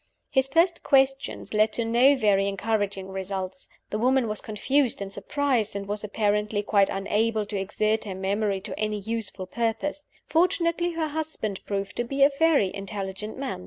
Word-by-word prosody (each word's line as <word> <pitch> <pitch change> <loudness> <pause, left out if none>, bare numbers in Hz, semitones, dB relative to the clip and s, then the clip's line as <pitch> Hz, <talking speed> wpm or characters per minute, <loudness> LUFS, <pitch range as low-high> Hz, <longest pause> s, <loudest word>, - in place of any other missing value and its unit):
His 265 -1 +3
first 335 +5 +2
questions 270 -3 +1
led 215 0 +3
to 235 - 0
no 245 +5 +5
very 205 -5 +3
encouraging 200 -1 -1
results. 190 -1 -5 0.2
The 210 - -1
woman 255 +1 +3
was 215 -1 -2
confused 250 +5 0
and 200 0 -5
surprised, 240 0 0
and 200 0 -4
was 210 +1 -3
apparently 210 0 0
quite 200 -1 +3
unable 210 +2 0
to 205 -1 -3
exert 215 +3 0
her 195 -3 -5
memory 195 +1 -1
to - - -7
any 215 0 0
useful 210 -2 -4
purpose. 235 +8 -2 0.2
Fortunately, 345 0 +1
her 320 -2 -1
husband 300 -10 -4
proved 200 -1 -3
to 240 - +1
be 275 +3 +1
a 280 - +6
very 305 - +4
intelligent 195 +1 -5
man. 270 - -4
215 Hz, 165 wpm, -26 LUFS, 200-270 Hz, 0.2 s, a